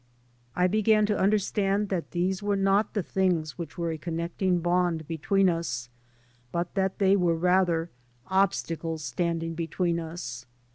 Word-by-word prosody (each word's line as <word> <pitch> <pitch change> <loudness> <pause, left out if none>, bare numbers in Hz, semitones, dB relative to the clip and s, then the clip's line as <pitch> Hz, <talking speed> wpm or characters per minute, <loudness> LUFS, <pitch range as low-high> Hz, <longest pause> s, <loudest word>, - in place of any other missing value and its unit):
I 180 - +3
began 215 +2 +3
to 210 0 0
under 205 +3 +4
stand 200 0 0
that 180 -4 -2
these 185 +2 -1
were 205 0 0
not 195 +3 +2
the 205 - 0
things 180 -5 0
which 165 -3 -6
were 170 -1 -1
a 160 - -5
connecting 170 +3 -1
bond 175 -2 0
between 190 +4 +2
us, 160 -9 -2 0.6
but 170 +2 -2
that 190 -1 0
they 195 -1 +4
were 175 -3 +2
rather 175 -1 +2 0.3
obstacles 165 -4 0
standing 165 0 -2
between 170 +1 -1
us. 130 -7 -6
175 Hz, 150 wpm, -27 LUFS, 165-195 Hz, 0.6 s, under